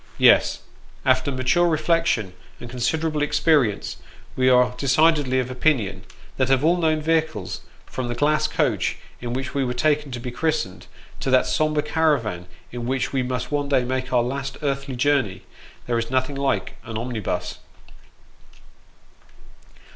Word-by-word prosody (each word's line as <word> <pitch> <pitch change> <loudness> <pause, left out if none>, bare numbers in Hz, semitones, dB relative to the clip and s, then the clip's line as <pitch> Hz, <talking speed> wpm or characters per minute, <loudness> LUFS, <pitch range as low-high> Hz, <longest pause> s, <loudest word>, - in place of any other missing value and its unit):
Yes, - - +5 0.4
after 130 +1 +3
mature 130 +7 +2
reflection, 155 - +1 0.3
and 120 - -8
considerable 150 +6 -1
experience, 145 -7 +1 0.4
we 130 0 +3
are 125 -1 +4
decidedly 140 0 +3
of 125 0 -2
opinion, 115 -9 0 0.3
that 130 -1 +1
of 135 +2 +3
all 170 +2 +4
known 155 -2 +1
vehicles, 160 - -1 0.2
from 130 -2 -4
the 120 - -3
glass 150 +4 +2
coach - - 0 0.2
in 120 -1 -5
which 130 0 -4
we 140 - 0
were 125 -1 -2
taken 150 +2 +1
to 120 - -4
be 125 +1 -5
christened, 125 - -2 0.3
to - - -2
that 130 0 +4
sombre 155 -1 +1
caravan 145 - 0 0.2
in 120 -1 -5
which 130 0 -1
we 135 - +1
must 125 +2 -3
one 145 -1 -1
day 135 -3 +3
make 130 0 -3
our 125 -2 +3
last 135 +2 -4
earthly 140 -2 -2
journey, 130 -7 +1 0.4
there 120 -1 0
is 115 - -4
nothing 130 +2 0
like 135 -9 -1
an 110 -1 -6
omnibus. 110 -7 -3
130 Hz, 150 wpm, -23 LUFS, 120-150 Hz, 0.4 s, Yes